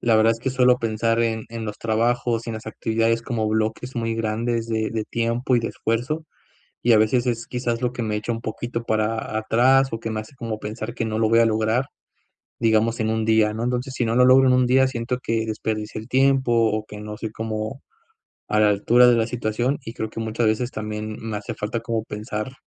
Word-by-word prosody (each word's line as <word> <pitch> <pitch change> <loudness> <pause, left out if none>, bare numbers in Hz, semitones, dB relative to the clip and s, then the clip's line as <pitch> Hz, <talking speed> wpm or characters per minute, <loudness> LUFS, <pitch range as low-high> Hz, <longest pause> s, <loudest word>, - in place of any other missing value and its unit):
la 115 -2 +3
verdad 110 +1 +5
es 115 - -7
que 130 - -1
suelo 125 -1 +4
pensar 115 0 0
en 115 -1 0
en 115 -1 -5
los 105 - -5
trabajos 115 +1 0
y - - -3
en - - -4
las 110 0 -8
actividades 115 +1 0
como 115 -2 -2
bloques 110 +3 -1
muy 115 -1 -1
grandes 115 +1 -1
de 110 -1 -1
de 110 -1 -2
tiempo 115 +3 0
y 120 - +2
de - - -2
esfuerzo, 130 +8 -2 0.6
y 120 - +5
a 110 - +7
veces, 120 +3 +2
es 115 -1 -2
quizás 120 -1 -2
lo 125 -1 0
que 125 - -5
me 105 -1 -1
echa 105 +3 -3
un 115 0 -3
poquito 115 +1 -4
para 110 0 -1
atrás 130 +5 +3
o 115 - -3
que 115 - -4
me 110 - -2
hace 110 +6 -10
como 115 -3 -5
pensar 110 +2 -5
que 115 - -2
no 110 -1 -2
lo 110 - +3
voy 115 +1 +5
a 115 - +5
lograr, 110 +3 +1 0.7
digamos, 115 +1 +2
en 110 0 0
un 110 0 0
día, 110 -1 +3
¿no? 110 +2 -3
Entonces, 125 +2 -2
si 120 - 0
no 115 0 0
lo 125 0 +6
logro 130 +1 +6
en 130 - +5
un 125 0 +4
día, 130 +1 +5
siento 125 -1 -3
que 115 -1 -1
desperdicié 110 -1 -3
el 110 - -12
tiempo, 130 -1 +3 0.2
o 110 0 -2
que 105 - -9
no 105 0 -7
soy 110 -1 -4
como 110 +3 -4 0.7
a 105 - +1
la 105 - +5
altura 115 +5 +5
de 120 - +5
la 115 -1 +2
situación, 120 +3 -1
y 115 - -7
creo 110 -2 -4
que 115 - -6
muchas 115 +1 -1
veces 115 +3 +1
también 105 -1 -5
me 110 -2 -4
hace 110 +3 -6
falta 105 +2 -3
como 115 -1 -2
pensar, 105 +2 -5
115 Hz, 235 wpm, -23 LUFS, 110-120 Hz, 0.7 s, a